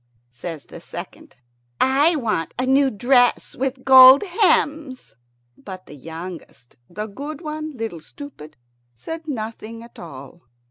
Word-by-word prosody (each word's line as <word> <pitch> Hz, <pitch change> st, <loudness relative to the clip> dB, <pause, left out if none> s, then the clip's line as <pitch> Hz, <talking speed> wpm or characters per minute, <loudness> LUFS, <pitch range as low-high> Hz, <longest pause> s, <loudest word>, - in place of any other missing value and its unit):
Says 155 Hz, +5 st, -7 dB
the -, -, -12 dB
second, -, -, -10 dB, 0.4 s
"I 285 Hz, +6 st, +3 dB
want 215 Hz, -, -2 dB
a 255 Hz, -, 0 dB
new 270 Hz, +1 st, +3 dB
dress 245 Hz, +2 st, +2 dB
with 265 Hz, 0 st, -3 dB
gold 260 Hz, +2 st, +9 dB
hems." 315 Hz, -, 0 dB, 0.4 s
But 185 Hz, -2 st, -10 dB
the -, -, -13 dB
youngest, 160 Hz, -3 st, -10 dB
the 210 Hz, +5 st, -5 dB
good 285 Hz, +9 st, -8 dB
one, 310 Hz, -2 st, -6 dB
Little 220 Hz, -8 st, -5 dB
Stupid, 155 Hz, -, -12 dB, 0.4 s
said 325 Hz, -, -8 dB
nothing 225 Hz, -3 st, -6 dB
at 235 Hz, -, -15 dB
all. 150 Hz, +1 st, -11 dB
250 Hz, 130 wpm, -21 LUFS, 175-285 Hz, 0.4 s, gold